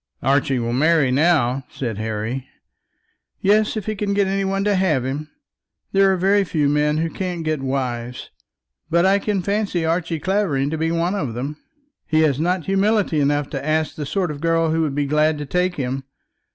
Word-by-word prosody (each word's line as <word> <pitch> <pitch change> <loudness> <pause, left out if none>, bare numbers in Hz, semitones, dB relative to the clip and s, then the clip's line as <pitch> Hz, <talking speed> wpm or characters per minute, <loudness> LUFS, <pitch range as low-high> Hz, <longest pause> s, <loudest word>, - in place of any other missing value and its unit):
"Archie 135 -1 +2
will 120 -1 -2
marry 150 0 +3
now," 135 -3 +2
said 115 -6 -4
Harry. 110 +4 -3 0.9
"Yes; 215 +2 +2
if 210 - -4
he 215 - -1
can 200 -1 -1
get 200 -1 +3
any 195 +1 0
one 195 0 -1
to 205 0 +2
have 170 -10 +1
him. 145 +4 -4 0.6
There 195 0 +4
are 190 - +1
very 195 +3 +3
few 155 -5 0
men 150 +1 +2
who 165 +1 0
can't 180 -3 -4
get 155 -3 -1
wives, 125 -2 -3 0.6
but 170 +2 +3
I 195 +1 +4
can 200 -2 -1
fancy 200 -4 -1
Archie 165 0 -1
Clavering 155 -7 0
to 160 - -2
be 160 0 +1
one 170 +2 0
of 140 - -3
them. 140 +5 -4 0.5
He 155 0 +3
has 145 -3 +2
not 175 +1 0
humility 195 -3 +2
enough 145 0 +1
to - - -4
ask 155 +1 0
the 150 -2 -5
sort 185 -2 -1
of 145 -1 -8
girl 165 -1 +2
who 165 +1 +1
would 150 -4 -1
be 145 0 0
glad 150 +2 +2
to 150 - -5
take 180 +5 0
him. 135 0 -3
160 Hz, 195 wpm, -21 LUFS, 140-190 Hz, 0.9 s, There